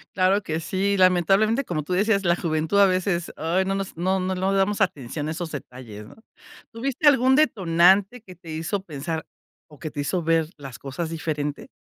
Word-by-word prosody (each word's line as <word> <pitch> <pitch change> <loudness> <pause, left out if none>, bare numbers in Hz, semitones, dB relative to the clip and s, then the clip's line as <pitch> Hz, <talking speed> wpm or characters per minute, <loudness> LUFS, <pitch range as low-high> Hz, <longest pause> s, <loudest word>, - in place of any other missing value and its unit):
Claro 190 +2 +3
que 160 -4 -3
sí. 195 +4 -1
Lamentablemente, 195 +7 +3
como 155 -4 -3
tú 180 - -4
decías, 200 +1 +1
la 170 0 +3
juventud 160 +3 0
a 200 - +8
veces, 185 -2 0
¡ay!, 170 +4 0
no, 195 - -1
nos 195 -3 -5
no 185 +3 0
no 185 0 -1
no 190 +2 0
damos 200 +2 +1
atención 145 -4 -2
a 155 - -2
esos 165 0 -5
detalles, 120 -7 -9
¿no? - - -15 0.6
¿Tuviste 270 +6 -1
algún 265 -1 +5
detonante 195 - +3
que 185 -4 -13
te 170 -1 -14
hizo 165 +5 -3
pensar, 160 -1 -5 0.4
o 150 - -17
que 155 - -6
te 145 - -7
hizo 175 +4 -2
ver 165 -1 +1
las 135 -3 -10
cosas 140 +4 -5
diferente? 150 -3 -4
180 Hz, 195 wpm, -24 LUFS, 160-195 Hz, 0.6 s, a